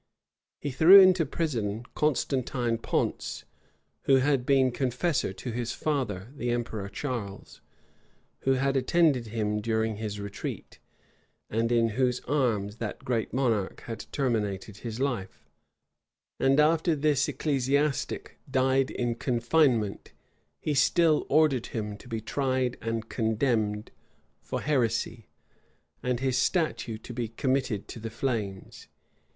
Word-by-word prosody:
He 145 Hz, -, -3 dB
threw 165 Hz, +9 st, +9 dB
into 185 Hz, -4 st, +6 dB
prison 115 Hz, -9 st, -2 dB
Constantine 130 Hz, -5 st, 0 dB
Ponce, -, -, -2 dB, 0.6 s
who 135 Hz, -, +5 dB
had 135 Hz, -1 st, +2 dB
been 135 Hz, -2 st, +4 dB
confessor 130 Hz, -, 0 dB
to 120 Hz, +5 st, -6 dB
his 120 Hz, 0 st, -3 dB
father, 120 Hz, -10 st, -2 dB
the 120 Hz, -3 st, -3 dB
emperor 115 Hz, -4 st, -2 dB
Charles; 110 Hz, -6 st, -5 dB, 0.8 s
who 135 Hz, -, +2 dB
had 135 Hz, +1 st, +1 dB
attended 135 Hz, -2 st, +2 dB
him 105 Hz, -1 st, -1 dB
during 110 Hz, -1 st, 0 dB
his 105 Hz, -1 st, -4 dB
retreat; 100 Hz, 0 st, -6 dB, 0.7 s
and 115 Hz, +2 st, 0 dB
in 115 Hz, -1 st, +3 dB
whose 125 Hz, +2 st, +1 dB
arms 115 Hz, -7 st, 0 dB
that 110 Hz, -3 st, -5 dB
great 120 Hz, -3 st, -1 dB
monarch 115 Hz, -7 st, 0 dB
had 115 Hz, -1 st, -7 dB
terminated 105 Hz, -6 st, -1 dB
his 115 Hz, +1 st, -6 dB
life: 95 Hz, -, -3 dB, 0.9 s
and 135 Hz, +2 st, +3 dB
after 160 Hz, +2 st, +3 dB
this 145 Hz, -1 st, +2 dB
ecclesiastic 140 Hz, 0 st, -1 dB
died 130 Hz, 0 st, +2 dB
in 120 Hz, -1 st, -1 dB
confinement, 120 Hz, -3 st, +1 dB, 0.5 s
he 150 Hz, -, -1 dB
still 155 Hz, +2 st, +3 dB
ordered 145 Hz, -5 st, +3 dB
him 105 Hz, -2 st, -4 dB
to -, -, -15 dB
be 115 Hz, -2 st, -3 dB
tried 130 Hz, +1 st, 0 dB
and 115 Hz, 0 st, -3 dB
condemned 110 Hz, -2 st, 0 dB, 0.5 s
for -, -, -4 dB
heresy, 115 Hz, -5 st, 0 dB, 0.7 s
and 125 Hz, -1 st, -1 dB
his 130 Hz, -1 st, +1 dB
statue 155 Hz, -9 st, 0 dB
to 120 Hz, +2 st, -10 dB
be 120 Hz, -1 st, -2 dB
committed 130 Hz, -2 st, -1 dB
to -, -, -8 dB
the 115 Hz, +1 st, -5 dB
flames. 110 Hz, -5 st, -4 dB
125 Hz, 125 wpm, -28 LUFS, 110-135 Hz, 0.9 s, threw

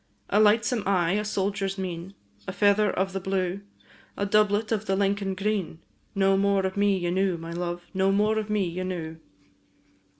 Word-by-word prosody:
A 205 Hz, -, +4 dB
lightsome 215 Hz, +2 st, +3 dB
eye, 180 Hz, -4 st, +2 dB
a 210 Hz, +2 st, 0 dB
soldier's 195 Hz, -1 st, -2 dB
mien, 185 Hz, 0 st, -5 dB, 0.3 s
A -, -, -2 dB
feather 205 Hz, 0 st, +3 dB
of 190 Hz, +1 st, -1 dB
the 195 Hz, -, -2 dB
blue, 190 Hz, 0 st, -2 dB, 0.6 s
A 200 Hz, -, 0 dB
doublet 210 Hz, +1 st, +2 dB
of 215 Hz, -1 st, -1 dB
the 190 Hz, -, +1 dB
Lincoln 195 Hz, 0 st, 0 dB
green, 195 Hz, -4 st, -2 dB, 0.4 s
No 195 Hz, 0 st, +3 dB
more 200 Hz, -1 st, +2 dB
of 190 Hz, -, -2 dB
me 200 Hz, -1 st, +2 dB
ye 175 Hz, -1 st, -2 dB
knew, 190 Hz, -1 st, +1 dB
my 165 Hz, 0 st, -8 dB
love! 175 Hz, 0 st, -4 dB
No 190 Hz, 0 st, +2 dB
more 210 Hz, +2 st, +2 dB
of 215 Hz, 0 st, -5 dB
me 210 Hz, -2 st, +1 dB
ye 175 Hz, +2 st, -4 dB
knew. 165 Hz, -3 st, -5 dB
195 Hz, 180 wpm, -26 LUFS, 185-205 Hz, 0.6 s, A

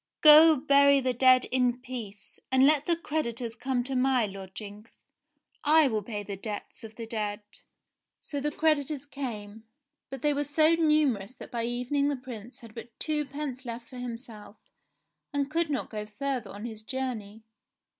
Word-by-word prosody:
"Go, 310 Hz, +1 st, +9 dB
bury 280 Hz, 0 st, +5 dB
the 255 Hz, -1 st, 0 dB
dead 255 Hz, +1 st, +5 dB
in 250 Hz, -1 st, +1 dB
peace, 235 Hz, -6 st, -9 dB
and 260 Hz, 0 st, +5 dB
let 300 Hz, 0 st, +3 dB
the 340 Hz, -, +3 dB
creditors 240 Hz, -8 st, -3 dB
come 250 Hz, 0 st, -1 dB
to 265 Hz, +1 st, -4 dB
my 255 Hz, -2 st, +3 dB
lodgings; 200 Hz, +2 st, -10 dB, 0.6 s
I 310 Hz, 0 st, +5 dB
will 215 Hz, -2 st, -1 dB
pay 210 Hz, 0 st, -5 dB
the 200 Hz, 0 st, -6 dB
debts 210 Hz, +5 st, -7 dB
of 220 Hz, -1 st, -10 dB
the 230 Hz, -, -6 dB
dead." 215 Hz, -2 st, -3 dB, 0.8 s
So 285 Hz, -, -4 dB
the 295 Hz, +2 st, -1 dB
creditors 300 Hz, -2 st, +1 dB
came, 225 Hz, -7 st, -7 dB, 0.5 s
but 270 Hz, -1 st, -8 dB
they 295 Hz, -1 st, +3 dB
were 290 Hz, +1 st, 0 dB
so 310 Hz, +3 st, +3 dB
numerous 300 Hz, -9 st, +2 dB
that -, -, -11 dB
by 235 Hz, -1 st, -2 dB
evening 250 Hz, +4 st, 0 dB
the 290 Hz, -, 0 dB
Prince 245 Hz, -2 st, -10 dB
had 230 Hz, -2 st, -13 dB
but 230 Hz, 0 st, -11 dB
twopence 290 Hz, -3 st, -3 dB
left 235 Hz, -1 st, -7 dB
for 255 Hz, -, -9 dB
himself, 230 Hz, -3 st, -8 dB, 0.8 s
and 285 Hz, 0 st, -1 dB
could 330 Hz, 0 st, +1 dB
not 280 Hz, -4 st, -3 dB
go 210 Hz, -1 st, -5 dB
further 260 Hz, +3 st, -3 dB
on 205 Hz, +3 st, -8 dB
his 220 Hz, -2 st, -7 dB
journey. 225 Hz, -4 st, -5 dB
255 Hz, 165 wpm, -28 LUFS, 225-285 Hz, 0.8 s, Go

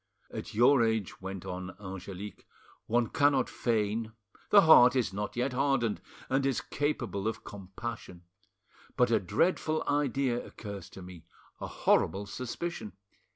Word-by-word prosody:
"At -, -, -6 dB
your 125 Hz, +3 st, +5 dB
age," 110 Hz, -5 st, -1 dB
went 95 Hz, -1 st, -6 dB
on 90 Hz, +1 st, -6 dB
Angelique, 95 Hz, +1 st, -8 dB, 0.4 s
"one 120 Hz, +1 st, +2 dB
cannot 140 Hz, -3 st, +3 dB
feign—the 110 Hz, -, 0 dB
heart 135 Hz, -7 st, +7 dB
is 120 Hz, -7 st, 0 dB
not 105 Hz, +1 st, -4 dB
yet 125 Hz, +2 st, -1 dB
hardened, 130 Hz, -5 st, +1 dB, 0.3 s
and 135 Hz, +1 st, +1 dB
is 135 Hz, -2 st, +1 dB
capable 120 Hz, -9 st, -2 dB
of 110 Hz, -, -3 dB
compassion. 95 Hz, -2 st, -8 dB, 0.7 s
But 120 Hz, -1 st, +3 dB
a 110 Hz, -, +4 dB
dreadful 155 Hz, -, 0 dB
idea 135 Hz, -4 st, 0 dB
occurs 100 Hz, -4 st, -8 dB
to 95 Hz, -, -11 dB
me—a 85 Hz, -2 st, -12 dB
horrible 100 Hz, +1 st, +1 dB
suspicion! 125 Hz, +1 st, -5 dB
115 Hz, 125 wpm, -30 LUFS, 100-130 Hz, 0.7 s, heart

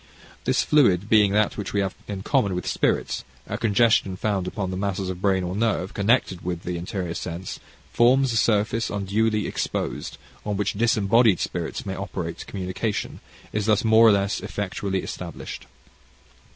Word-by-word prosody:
This -, -, +2 dB
fluid 105 Hz, -, +3 dB
being 105 Hz, -3 st, +5 dB
that 105 Hz, 0 st, +2 dB
which 105 Hz, -, -4 dB
we 100 Hz, -, +2 dB
have 95 Hz, -1 st, -2 dB
in 100 Hz, -2 st, -5 dB
common 105 Hz, -7 st, +1 dB
with 90 Hz, -, -3 dB
spirits, -, -, 0 dB, 0.2 s
a -, -, -4 dB
congestion 105 Hz, -3 st, +2 dB
found 95 Hz, -1 st, -1 dB
upon 95 Hz, 0 st, -3 dB
the -, -, -3 dB
masses 95 Hz, -1 st, -2 dB
of 90 Hz, 0 st, -8 dB
brain 95 Hz, -2 st, +2 dB
or 90 Hz, +1 st, -3 dB
nerve, 105 Hz, -3 st, 0 dB
connected 100 Hz, -3 st, +1 dB
with 90 Hz, -1 st, -3 dB
the 90 Hz, -, -3 dB
interior 90 Hz, 0 st, -4 dB
sense, 85 Hz, +1 st, -5 dB, 0.3 s
forms 130 Hz, +1 st, +4 dB
a -, -, +1 dB
surface 110 Hz, +1 st, +1 dB
unduly 105 Hz, +2 st, 0 dB
exposed, -, -, -3 dB, 0.3 s
on 105 Hz, -1 st, -2 dB
which 100 Hz, 0 st, 0 dB
disembodied 110 Hz, -1 st, +3 dB
spirits 85 Hz, +2 st, -3 dB
may 95 Hz, -, -3 dB
operate: 90 Hz, -4 st, -5 dB
communication 100 Hz, +3 st, -3 dB, 0.3 s
is 105 Hz, 0 st, -1 dB
thus 105 Hz, -2 st, +3 dB
more 110 Hz, 0 st, +6 dB
or -, -, +8 dB
less 100 Hz, 0 st, +1 dB
effectually 95 Hz, -1 st, -3 dB
established. -, -, -7 dB
100 Hz, 165 wpm, -24 LUFS, 95-110 Hz, 0.3 s, or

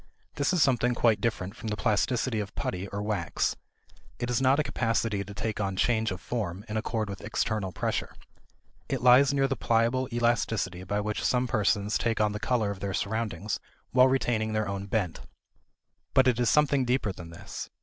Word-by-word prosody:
This 140 Hz, +3 st, 0 dB
is 180 Hz, -5 st, +4 dB
something 125 Hz, -2 st, +2 dB
quite 110 Hz, -3 st, +3 dB
different 100 Hz, -3 st, -2 dB
from 115 Hz, -, -8 dB
the 105 Hz, -1 st, -2 dB
plasticity 115 Hz, +2 st, +1 dB
of 100 Hz, -1 st, -5 dB
putty 95 Hz, +1 st, -3 dB
or 100 Hz, +1 st, -4 dB
wax. 105 Hz, -7 st, -1 dB, 0.6 s
It 120 Hz, 0 st, -2 dB
is 120 Hz, -, +1 dB
not 135 Hz, +1 st, +4 dB
a -, -, +3 dB
capacity 115 Hz, -5 st, 0 dB
to 100 Hz, +1 st, -10 dB
take 110 Hz, -1 st, -2 dB
on 95 Hz, -1 st, -1 dB
change 110 Hz, +2 st, +2 dB
of 95 Hz, -, -4 dB
form 100 Hz, -3 st, -4 dB
in 105 Hz, -, -5 dB
accord 110 Hz, 0 st, -1 dB
with 100 Hz, -1 st, -7 dB
external 105 Hz, -2 st, -1 dB
pressure. -, -, -2 dB, 0.7 s
It -, -, -2 dB
lies 125 Hz, +2 st, +7 dB
near 135 Hz, -1 st, +2 dB
the 135 Hz, -, -1 dB
pliable 115 Hz, +3 st, +1 dB
elasticity 115 Hz, -6 st, 0 dB
by 105 Hz, +2 st, -1 dB
which 105 Hz, 0 st, -3 dB
some 125 Hz, 0 st, +2 dB
persons 105 Hz, -2 st, +1 dB
take 115 Hz, -1 st, 0 dB
on 105 Hz, -1 st, +3 dB
the 105 Hz, -, -4 dB
color 110 Hz, -3 st, 0 dB
of 100 Hz, -, -7 dB
their 100 Hz, -1 st, -3 dB
surroundings 105 Hz, -2 st, -2 dB, 0.3 s
while 130 Hz, 0 st, +6 dB
retaining 115 Hz, -4 st, 0 dB
their 110 Hz, -1 st, 0 dB
own 100 Hz, 0 st, -4 dB
bent. 100 Hz, -5 st, -1 dB, 0.9 s
But 130 Hz, -, +6 dB
it 125 Hz, -2 st, +2 dB
is 120 Hz, -, +3 dB
something 145 Hz, -3 st, +3 dB
deeper 125 Hz, -4 st, 0 dB
than 85 Hz, -2 st, -10 dB
this. 85 Hz, -, -8 dB
110 Hz, 190 wpm, -28 LUFS, 100-125 Hz, 0.9 s, lies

